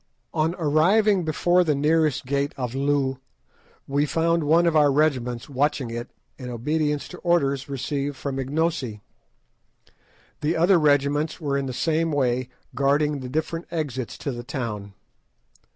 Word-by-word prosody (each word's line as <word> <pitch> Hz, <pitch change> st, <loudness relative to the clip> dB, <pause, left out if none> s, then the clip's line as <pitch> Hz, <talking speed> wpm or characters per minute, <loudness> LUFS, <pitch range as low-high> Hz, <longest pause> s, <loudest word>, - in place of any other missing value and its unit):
On 160 Hz, +2 st, +1 dB
arriving 180 Hz, +6 st, +3 dB
before 175 Hz, +3 st, +3 dB
the 155 Hz, -4 st, +1 dB
nearest 150 Hz, 0 st, +2 dB
gate 140 Hz, +2 st, -1 dB
of 125 Hz, -2 st, -3 dB
Loo 135 Hz, -1 st, 0 dB, 0.7 s
we 145 Hz, +2 st, +1 dB
found 165 Hz, +1 st, +1 dB
one 165 Hz, +4 st, +4 dB
of 165 Hz, -2 st, +2 dB
our 145 Hz, -2 st, +5 dB
regiments 130 Hz, -5 st, 0 dB
watching 140 Hz, -3 st, -1 dB
it 120 Hz, +1 st, -5 dB, 0.3 s
in 125 Hz, -1 st, -6 dB
obedience 150 Hz, +4 st, -1 dB
to 180 Hz, -, -10 dB
orders 140 Hz, -6 st, +1 dB
received 140 Hz, +1 st, -3 dB
from 135 Hz, 0 st, -4 dB
Ignosi. 135 Hz, -5 st, -1 dB, 1.4 s
The 155 Hz, +3 st, 0 dB
other 175 Hz, +2 st, +5 dB
regiments 145 Hz, +1 st, +2 dB
were 145 Hz, -4 st, -1 dB
in 140 Hz, -1 st, -1 dB
the -, -, -3 dB
same 160 Hz, +5 st, 0 dB
way 130 Hz, -3 st, 0 dB, 0.2 s
guarding 145 Hz, +2 st, +1 dB
the 130 Hz, -1 st, -6 dB
different 160 Hz, +4 st, -3 dB
exits 135 Hz, -7 st, -4 dB
to 140 Hz, -, -4 dB
the 120 Hz, -1 st, -6 dB
town. 105 Hz, -6 st, -5 dB
145 Hz, 145 wpm, -24 LUFS, 130-160 Hz, 1.4 s, our